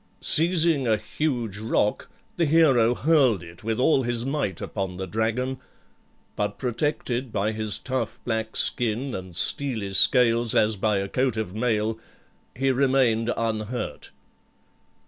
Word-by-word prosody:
Seizing 165 -4 +4
a 110 -1 +3
huge 115 -2 -3
rock, 105 -1 -1 0.3
the 170 -2 +1
hero 135 -7 +4
hurled 135 - +2
it 85 +2 -13
with 110 +1 -2
all 135 +1 +3
his 120 -1 -2
might 135 - -2
upon 95 -3 -4
the 95 - -4
dragon; 115 +7 -2 0.8
but 105 0 -2
protected 125 -1 -2
by 105 0 -1
his 110 -2 -1
tough 130 0 -4
black 110 -2 -3
skin 120 +3 -1
and 95 -2 -7
steely 110 -1 -1
scales 115 +2 +4
as 110 0 +3
by 105 +1 0
a 100 0 -2
coat 125 +2 0
of 110 -4 -3
mail, 110 -1 -1 0.6
he 135 +1 +1
remained 130 -4 +2
unhurt. 110 +1 -4
115 Hz, 135 wpm, -24 LUFS, 105-130 Hz, 0.8 s, Seizing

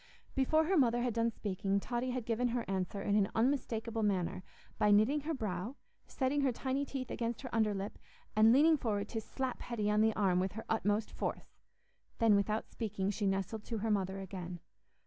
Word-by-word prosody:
Before 305 +4 +3
her 365 +4 +2
mother 240 -2 +3
had 245 -2 0
done 230 +1 +2
speaking, 200 -2 -1
Totty 240 +4 -2
had 250 -2 -3
given 235 +1 +1
her 240 -1 -1
answer 195 +1 -2
in 205 - +1
an 200 -2 +3
unmistakable 230 -2 0
manner, 190 -4 0 0.4
by 210 - +4
knitting 215 +8 +4
her 320 +3 -2
brow, 215 +1 -3 0.3
setting 275 +2 0
her 270 -2 +3
tiny 265 +3 -1
teeth 265 -2 -5
against 235 +2 -3
her 255 - -7
underlip, 210 -3 0 0.4
and 220 +1 +7
leaning 305 +5 +6
forward 210 -6 -1
to 225 - -3
slap 260 +3 -4
Hetty 215 -3 -1
on 210 0 +3
the 220 0 +3
arm 185 -3 +2
with 185 0 -1
her 225 - -7
utmost 215 0 0
force. - - -5 0.6
Then, 225 -2 +5
without 210 +2 0
speaking, 205 -3 -2
she 205 0 -1
nestled 195 +3 -1
to 230 - -3
her 220 +1 -1
mother 190 -2 0
again. 180 -2 -6
220 Hz, 190 wpm, -34 LUFS, 200-245 Hz, 0.6 s, and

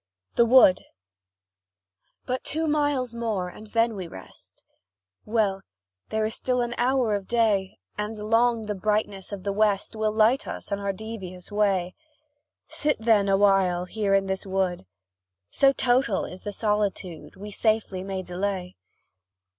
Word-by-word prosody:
THE 235 - +4
WOOD. 235 -6 +7 1.4
But 255 0 -2
two 320 +2 -1
miles 290 -5 0
more, 220 -6 -2
and 215 +4 -12
then 230 +1 +1
we 185 -3 -5
rest! 95 - -14 0.6
Well, 210 -3 0 0.5
there 220 0 0
is 220 - -2
still 250 0 -1
an 240 0 -2
hour 250 -2 +2
of 200 -2 -3
day, 215 -5 +1 0.2
And 210 +1 -3
long 225 +2 +2
the 210 -1 -3
brightness 205 -1 -1
of 200 -2 -6
the 200 - -1
West 205 0 +1
Will 215 0 0
light 220 +5 +3
us - - -6
on 200 - -1
our 200 0 -1
devious 195 -3 -8
way; 195 -4 +1 0.7
Sit 300 0 0
then, 220 -3 +3
awhile, 195 -3 +3
here 200 0 0
in 195 0 +2
this 190 0 -2
wood 185 - -1 0.6
So 275 -1 +5
total 245 -5 +1
is 185 - -9
the 205 - -5
solitude, 200 -7 -2
We 205 +2 -9
safely 215 -3 0
may 190 -1 -4
delay. 180 - -3
210 Hz, 145 wpm, -25 LUFS, 190-230 Hz, 1.4 s, WOOD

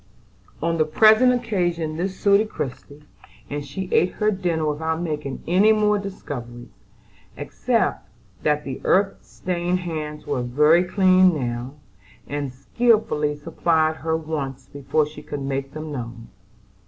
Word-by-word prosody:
On 165 0 0
the 155 - +4
present 220 +9 +6
occasion 175 -10 -1
this 185 +3 -3
suited 205 +2 +3
Christie; 140 0 -7 0.5
and 145 0 -3
she 150 +7 -6
ate 180 - +3
her 215 0 +1
dinner 175 -5 -1
without 160 +2 -1
making 150 -5 -4
any 190 +6 +4
more 210 -1 +3
discoveries, 125 -11 -7 0.7
except - - -1 0.3
that 150 0 +1
the 135 -2 -6
earth 195 +1 +2
stained 180 0 -2
hands 155 -3 -5
were 125 - -1
very 150 +8 +4
clean 185 -1 +4
now, 120 +2 -4 0.5
and 145 -2 -4
skilfully 150 - +1
supplied 160 +1 0
her 160 0 -1
wants 140 -5 -5
before 145 +3 -1
she 150 0 -10
could 145 -2 -6
make 135 0 -3
them 155 0 -6
known. 120 -4 -7
155 Hz, 135 wpm, -23 LUFS, 145-185 Hz, 0.7 s, present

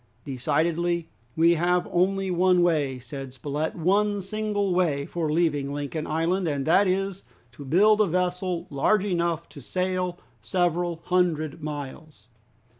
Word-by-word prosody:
"Decidedly 165 +5 0 0.3
we 165 +1 +5
have 175 +2 +1
only 190 +2 +1
one 180 0 +3
way," 150 -6 +1
said 130 +1 -8
Spilett, 145 +4 -3
"one 200 +4 +1
single 205 -1 -1
way 155 -6 +1
for 160 -2 -2
leaving 150 -4 +1
Lincoln 145 +2 -4
Island, 170 +4 0
and 140 -3 -1
that 190 +5 +4
is, 195 +1 -1 0.3
to 130 +4 -11
build 205 +10 +4
a 210 - +3
vessel 180 0 -1
large 195 +9 +2
enough 170 -3 -1
to 145 - -12
sail 180 +4 -2 0.2
several 175 +4 0
hundred 165 -4 0
miles. 145 -5 -7
170 Hz, 135 wpm, -25 LUFS, 150-185 Hz, 0.3 s, we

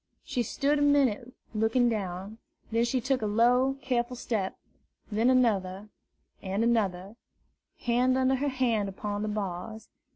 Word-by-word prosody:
She 255 -4 -2
stood 280 +5 0
a - - 0
minute 270 -5 +2 0.2
looking 225 +3 +2
down; 200 -1 -3 0.3
then 230 +1 +2
she 255 +2 0
took 260 +1 0
a 215 - 0
slow, 250 +5 +3
careful 250 -1 -1
step; 215 -5 -3 0.5
then 225 +4 +2
another 210 -6 +1 0.5
and 195 +3 -1
another, 205 -3 0 0.6
hand 250 +2 +2
under 260 0 +3
hand 255 -6 0
upon 205 +1 -4
the 215 - -2
bars. 210 +1 -5
230 Hz, 135 wpm, -28 LUFS, 205-255 Hz, 0.6 s, slow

